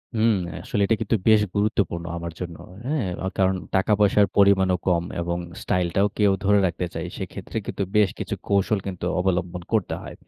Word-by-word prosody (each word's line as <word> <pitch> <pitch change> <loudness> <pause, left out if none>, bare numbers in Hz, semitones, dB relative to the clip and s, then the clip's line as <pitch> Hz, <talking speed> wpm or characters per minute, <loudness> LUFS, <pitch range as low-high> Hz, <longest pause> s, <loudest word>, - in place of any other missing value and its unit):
হুম। 110 0 +4 0.3
আসলে 105 - -1
এটা 115 - +2
কিন্তু 110 +1 +1
বেশ 110 -1 +6
গুরুত্বপূর্ণ 100 -5 0
আমার 85 0 -5
জন্য। 85 -2 -5 0.3
হ্যাঁ? 140 -6 0 0.2
আ - - 0
কারণ 95 0 +3 0.2
টাকা 95 +3 +2
পয়সার 105 0 +4
পরিমাণও 95 -2 +5
কম 85 -2 +3 0.2
এবং 85 0 -2 0.2
স্টাইলটাও 90 +2 +1
কে 105 - 0
ও - - +3
ধরে 105 0 +5
রাখতে 90 +1 -3
চাই। 80 +1 -4
সেক্ষেত্রে - - -6
কিন্তু - - -2
বেশ 105 -2 +5
কিছু - - -3
কৌশল 100 +1 +2
কিন্তু 90 -2 -4
অবলম্বন 90 -1 -1
করতে 110 -5 +1
হয়। - - -8
95 Hz, 180 wpm, -24 LUFS, 90-105 Hz, 0.3 s, বেশ